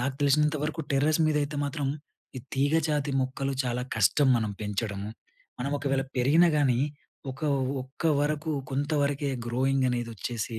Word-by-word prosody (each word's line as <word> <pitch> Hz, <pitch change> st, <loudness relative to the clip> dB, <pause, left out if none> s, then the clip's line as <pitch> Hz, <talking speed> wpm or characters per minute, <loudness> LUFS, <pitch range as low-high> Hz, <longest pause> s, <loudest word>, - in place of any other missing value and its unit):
నాకు 130 Hz, +2 st, -1 dB
తెలిసినంత 150 Hz, +2 st, +3 dB
వరకు, 155 Hz, +1 st, -3 dB
టెర్రస్ 150 Hz, +4 st, +2 dB
మీద 150 Hz, -, +1 dB
అయితే 145 Hz, +1 st, -4 dB
మాత్రం, 140 Hz, 0 st, -2 dB, 0.5 s
ఈ -, -, -2 dB, 0.2 s
తీగ 140 Hz, +3 st, +2 dB
జాతి 150 Hz, -1 st, 0 dB
మొక్కలు, 135 Hz, +1 st, -2 dB
చాలా 125 Hz, 0 st, -1 dB
కష్టం, 110 Hz, +8 st, +4 dB
మనం 110 Hz, -2 st, -1 dB
పెంచడము. 105 Hz, 0 st, -3 dB, 0.5 s
మనం 140 Hz, +3 st, -1 dB
ఒకవేళ 135 Hz, -1 st, 0 dB
పెరిగినా 155 Hz, +8 st, +5 dB
గానీ, 130 Hz, -4 st, +3 dB, 0.5 s
ఒక 135 Hz, -, -14 dB, 0.4 s
ఒక్క 135 Hz, +6 st, -12 dB, 0.2 s
వరకు 150 Hz, +2 st, -1 dB, 0.2 s
కొంతవరకే, 145 Hz, 0 st, 0 dB, 0.2 s
గ్రోయింగ్ 130 Hz, +2 st, +1 dB
అనేది 120 Hz, -1 st, -2 dB
ఒచ్చేసి 115 Hz, +1 st, -4 dB
135 Hz, 145 wpm, -28 LUFS, 125-145 Hz, 0.5 s, పెరిగినా